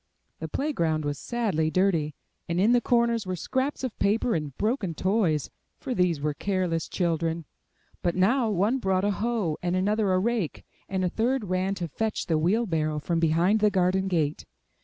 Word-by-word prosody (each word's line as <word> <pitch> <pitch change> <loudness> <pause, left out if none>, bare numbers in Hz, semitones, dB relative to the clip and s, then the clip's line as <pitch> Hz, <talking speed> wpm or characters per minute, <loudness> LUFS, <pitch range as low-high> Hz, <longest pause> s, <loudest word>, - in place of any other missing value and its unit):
The 160 - -4
play 290 - -2
ground 160 - 0
was 145 -1 -2
sadly 205 -10 0
dirty, 165 -5 +1 0.3
and 170 +1 0
in 210 +5 +4
the 245 0 +4
corners 235 -4 +1
were 185 - -1
scraps 265 - -2
of 255 -4 -3
paper 225 +4 +2
and 150 -5 -3
broken 210 - -1
toys, 185 - +1 0.3
for 260 - -4
these 180 -7 +1
were 150 +1 -1
careless 180 -2 -1
children. 165 -2 -1 0.6
But 175 - 0
now, 225 +6 +3
one 210 +6 +1
brought 190 -3 +1
a 205 - +2
hoe, 205 -6 -1
and 180 0 0
another 205 +2 +1
a 185 - +3
rake, 210 -3 -1 0.2
and 190 -1 0
a - - +1
third 240 +5 0
ran 185 +2 0
to 175 -3 -3
fetch 220 +8 -2
the 160 -2 +1
wheel 205 +9 +2
barrow 155 -5 -1
from 165 +3 -1
behind 170 +6 +3
the 210 0 +4
garden 190 0 +1
gate. 155 -5 -1
185 Hz, 185 wpm, -26 LUFS, 165-220 Hz, 0.6 s, in